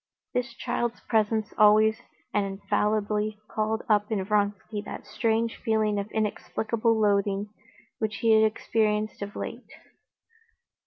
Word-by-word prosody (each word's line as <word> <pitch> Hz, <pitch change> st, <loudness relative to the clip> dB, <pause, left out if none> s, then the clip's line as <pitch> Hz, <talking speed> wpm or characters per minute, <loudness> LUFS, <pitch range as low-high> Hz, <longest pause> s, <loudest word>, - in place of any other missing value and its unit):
This 245 Hz, -1 st, -2 dB
child's 240 Hz, 0 st, -2 dB
presence 220 Hz, -1 st, 0 dB
always 215 Hz, +1 st, +6 dB, 0.3 s
and 205 Hz, -, +2 dB
infallibly 210 Hz, +2 st, 0 dB
called 220 Hz, +1 st, -1 dB
up 210 Hz, 0 st, +2 dB
in 200 Hz, -3 st, 0 dB
Vronsky 205 Hz, +1 st, -1 dB
that 210 Hz, -, -8 dB
strange 225 Hz, 0 st, 0 dB
feeling 215 Hz, -2 st, +1 dB
of 200 Hz, +1 st, -4 dB
inexplicable 220 Hz, +1 st, 0 dB
loathing 200 Hz, -1 st, +1 dB, 0.5 s
which 220 Hz, -1 st, -1 dB
he 225 Hz, +2 st, +2 dB
had 220 Hz, 0 st, +6 dB
experienced 215 Hz, -1 st, 0 dB
of 200 Hz, 0 st, -5 dB
late. -, -, -6 dB
215 Hz, 120 wpm, -27 LUFS, 205-220 Hz, 0.5 s, always